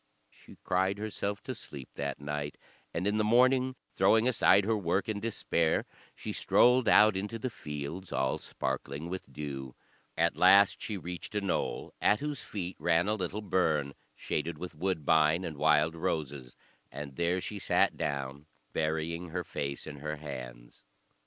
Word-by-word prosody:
She - - -17
cried 95 +2 +1
herself 105 -1 -3
to 130 - -4
sleep 70 - -8
that 70 0 -4
night, 75 0 -4 0.3
and 85 - -2
in 105 +1 +1
the - - +3
morning, 130 +3 +4 0.2
throwing 110 +2 +4
aside 105 -5 +5
her 110 +1 +2
work 95 -1 0
in 110 -2 -2
despair, 100 -7 0 0.3
she - - -5
strolled 125 0 +4
out 105 -1 +7
into 105 +4 -3
the 125 +3 -3
fields, 75 +3 -6
all 65 0 0
sparkling 70 +4 -4
with 95 +1 -6
dew. 65 -4 -6 0.4
At 85 +1 +2
last 95 +2 +6
she 105 - -3
reached 90 +3 -7
a 105 - +1
knoll, 100 - -2
at 105 - +4
whose 145 -4 -4
feet 95 -5 -5
ran 85 +2 +2
a 105 - +2
little 100 +1 -3
burn, 80 -8 +1 0.2
shaded 80 +1 -3
with 90 +3 -7
woodbine 80 0 +2
and 80 - -5
wild 75 +2 +3
roses; 75 -7 -3 0.4
and 70 0 -7
there 85 +3 +1
she 105 +2 -5
sat - - +2
down, 70 0 -3 0.3
burying 80 +2 -1
her 90 +2 -3
face 70 -3 -4
in 75 -2 -8
her 75 +2 -4
hands. 65 -5 -9
85 Hz, 160 wpm, -30 LUFS, 75-100 Hz, 0.4 s, out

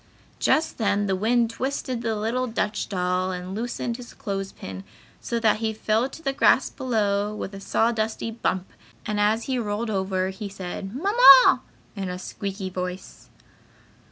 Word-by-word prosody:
Just 315 -3 +1
then 205 -1 +1
the 195 -1 +1
wind 230 +4 +2
twisted 255 -1 -3
the 225 -2 -1
little 230 +4 -1
Dutch 210 -2 -2
doll 180 -1 0
and 180 +1 -5
loosened 235 +2 -3
his 245 -1 -11
clothes 195 -1 -4
pin, 95 0 -8 0.4
so 235 - -2
that 220 -2 +3
he 220 0 -1
fell 220 +4 +1
to 325 - -12
the 275 - 0
grass 270 -1 +4
below 210 -5 0
with 200 - -5
a 195 - -7
sawdusty 225 +1 0
bump 190 -5 -2 0.4
and 210 -2 -1
as 215 +2 +2
he 260 -2 -1
rolled 220 +1 -2
over 190 -1 0
he 200 +2 -6
said, 195 +2 -6
"Mamma!" 455 - +7 0.3
in 195 -2 -4
a 180 - -4
squeaky 195 +1 -5
voice. 180 0 -6
215 Hz, 160 wpm, -25 LUFS, 195-235 Hz, 0.4 s, Mamma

